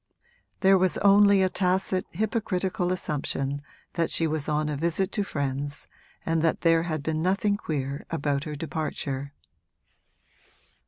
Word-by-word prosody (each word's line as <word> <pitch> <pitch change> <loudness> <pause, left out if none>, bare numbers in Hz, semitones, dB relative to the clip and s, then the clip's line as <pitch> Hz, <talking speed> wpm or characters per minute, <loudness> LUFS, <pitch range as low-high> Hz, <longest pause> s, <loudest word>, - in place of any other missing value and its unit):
There 190 -1 +6
was 185 -1 +2
only 200 -1 +6
a - - +4
tacit 185 0 0
hypocritical 190 -3 -1
assumption 145 -4 -2 0.3
that 165 -1 0
she 165 - 0
was 155 -1 -2
on 150 0 +1
a 150 - -2
visit 170 +6 0
to 205 - 0
friends 145 -4 -3 0.4
and 165 -1 +1
that 165 0 +1
there 165 -1 +4
had 155 -3 -3
been 155 +1 -1
nothing 195 +3 +2
queer 140 -6 -4
about 145 -3 -1
her 150 -1 -4
departure. 140 -2 -4
165 Hz, 140 wpm, -26 LUFS, 145-185 Hz, 0.4 s, There